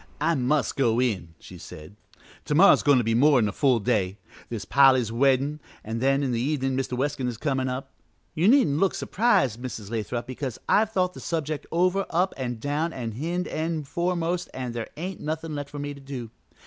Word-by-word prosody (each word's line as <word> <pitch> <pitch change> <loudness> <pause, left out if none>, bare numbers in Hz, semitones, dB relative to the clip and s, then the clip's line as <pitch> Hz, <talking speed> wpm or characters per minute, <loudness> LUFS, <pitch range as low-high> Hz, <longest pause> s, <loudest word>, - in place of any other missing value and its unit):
"I 165 +3 +2
must 140 0 0
go 120 -4 +2
in," 95 -10 -1
she 90 - -12
said, 80 +4 -11 0.5
"to 150 - -1
morrow 195 +5 +8
is - - +4
goin' 145 -2 +4
to 125 - +2
be 115 - 0
a - - +2
more 140 +3 +5
'n 105 -4 +2
full 130 0 +2
day. 100 -4 0 0.3
There's 115 -3 -5
Polly's 130 -4 +4
weddin' 135 +4 +2 0.2
an' 110 +1 -4
then 135 +3 +2
in 130 - 0
the 115 -1 -1
evenin' 135 -1 0
Mr. 130 -1 -2
Weskin 135 -1 -1
is 120 -2 -4
comin' 130 -1 -1
up. 130 +1 -5 0.4
You 165 +5 +2
needn't 210 - +4
look 195 0 +2
surprised, 135 - +1
Mrs. 115 -5 -6
Lathrop, 120 +1 -3
because 130 -1 -5
I've 220 +1 +3
thought 180 -3 0
the - - -10
subject 155 -3 -3
over 185 +3 +1
up 180 +3 +1
an' 125 -2 -3
down 145 +7 -2
an' 115 -3 -4
hind 170 +10 -3
end 155 -2 -3
foremost 175 +1 -1
an' 125 -2 -4
there 115 -1 -5
ain't 180 +3 -5
nothin' 160 +1 -4
left 145 -1 -5
for 145 - -9
me 145 0 -4
to 140 - -13
do. 130 -5 -7
135 Hz, 210 wpm, -25 LUFS, 120-160 Hz, 0.5 s, morrow